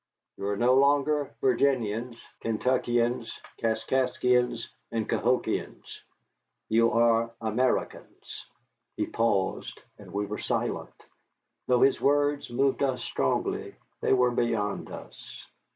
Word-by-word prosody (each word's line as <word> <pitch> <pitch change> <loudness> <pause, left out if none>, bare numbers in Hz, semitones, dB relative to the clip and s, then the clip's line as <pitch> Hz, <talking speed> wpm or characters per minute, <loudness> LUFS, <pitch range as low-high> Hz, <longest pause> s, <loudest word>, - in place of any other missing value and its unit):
You 100 - -4
are 100 0 -1
no 120 +3 +4
longer 140 +1 +3
Virginians, 120 -3 +1 0.2
Kentuckians, 120 0 0 0.2
Kaskaskians, 125 +1 +1 0.2
and 115 -2 -2
Cahokians 125 +6 -1 0.7
you 115 +1 +4
are 115 0 +3
Americans." 115 +3 -2 0.5
He - - 0
paused, 105 -5 -1 0.2
and 100 -3 -12
we 100 +2 -1
were 105 +1 -5
silent. - - -3 0.6
Though 125 -1 +3
his 135 - +4
words 145 0 +2
moved 135 +3 +1
us 130 -3 0
strongly, - - -1 0.3
they - - +1
were 125 -1 +3
beyond 115 -4 -1
us. - - -11
120 Hz, 105 wpm, -27 LUFS, 115-130 Hz, 0.7 s, no